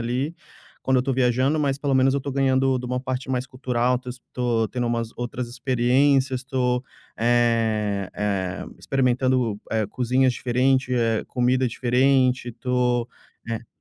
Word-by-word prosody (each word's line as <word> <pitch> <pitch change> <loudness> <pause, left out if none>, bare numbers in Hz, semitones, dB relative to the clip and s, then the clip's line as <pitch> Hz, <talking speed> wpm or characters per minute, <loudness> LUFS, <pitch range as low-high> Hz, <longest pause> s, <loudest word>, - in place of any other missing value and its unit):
ali, 125 +7 -2 0.5
quando 130 -1 +2
eu 125 - +3
tô 135 +1 -1
viajando, 130 +4 +2
mas 140 -2 +1
pelo 140 -1 -1
menos 130 +1 +4
eu 140 - 0
tô 140 - -5
ganhando 135 -1 +2
de 125 - -6
uma 125 +1 -1
parte 130 0 -4
mais 130 0 -1
cultural, 125 -1 0
tô 125 0 -11
es 125 +1 -7
tô 120 -3 0
tendo 125 -1 -2
umas 115 -1 -1
outras 120 0 -4
experiências, 130 +2 +2
tô, 125 -1 0 0.3
eh 110 -4 +1
eh 100 -2 -2
experimentando, 130 -4 +1
eh, 110 -2 0
cozinhas 125 +3 +1
diferente, 125 +1 +1
eh, 115 -2 +1
comida 125 +1 +1
diferente, 125 +1 +2
tô 125 -1 0 0.4
né 115 0 -5
125 Hz, 150 wpm, -23 LUFS, 120-130 Hz, 0.5 s, menos